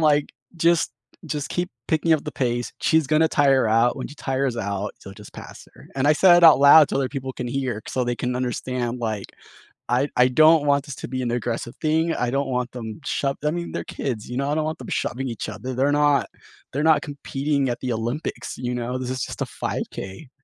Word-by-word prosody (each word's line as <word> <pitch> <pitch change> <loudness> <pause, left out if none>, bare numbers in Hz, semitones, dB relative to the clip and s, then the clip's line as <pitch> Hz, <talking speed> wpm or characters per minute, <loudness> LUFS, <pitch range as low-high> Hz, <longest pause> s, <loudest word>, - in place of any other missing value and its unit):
like, 150 -2 +2 0.2
"Just 170 0 +2 0.3
just 145 -2 -4
keep 180 0 -2 0.2
picking 160 +1 +2
up 155 -2 +1
the 150 - -5
pace. 120 -2 -2
She's 160 -3 +3
gonna 155 +2 +3
tire 135 -5 +3
out. 115 +4 +3
When 130 - -4
she 145 - -11
tires 135 -3 -2
out, 100 -1 -3
so, 95 - -11
just 105 +1 -13
pass - - -11
her." - - -15
And 135 +1 +1
I 150 - +6
said 175 +3 +6
it 175 - +4
out 160 -4 +9
loud 145 +1 +8
so - - 0
other 135 -1 0
people 130 -1 -5
can 125 -1 -5
hear, 125 -4 -2
so 130 - -1
they 120 0 -2
can 125 0 -2
understand, 125 -1 -2
like, 110 -4 -3 0.6
I 130 +4 +1
I 125 0 +6
don't 155 +3 +5
want 140 0 +2
this 140 -4 -7
to - - -7
be 130 +1 -3
an 120 -2 -1
aggressive 120 0 -3
thing, 160 +1 +1
I 125 - -1
don't 135 +2 -1
want 125 -1 -2
them 115 +1 -7
shove 140 0 -1
I 150 - +2
mean, 170 +1 -4
they're - - -4
kids, 115 -6 -4
you 125 - -5
know, 140 +2 -1
I 150 - 0
don't 155 - 0
want 155 0 -3
them - - -9
shoving 130 +2 -2
each 115 - -5
other. 125 +5 -6
They're 135 +3 +1
not 145 -1 +3 0.4
they're 145 - -1
not 155 -2 +4
competing 140 -2 -2
at 120 - -3
the 125 -2 -2
Olympics, 120 +7 -4
you 125 0 -3
know? 120 +1 -3
This 130 -1 -4
is 130 -1 -2
just - - -7
a - - +1
5K. 95 +9 -6
135 Hz, 230 wpm, -23 LUFS, 120-150 Hz, 0.6 s, out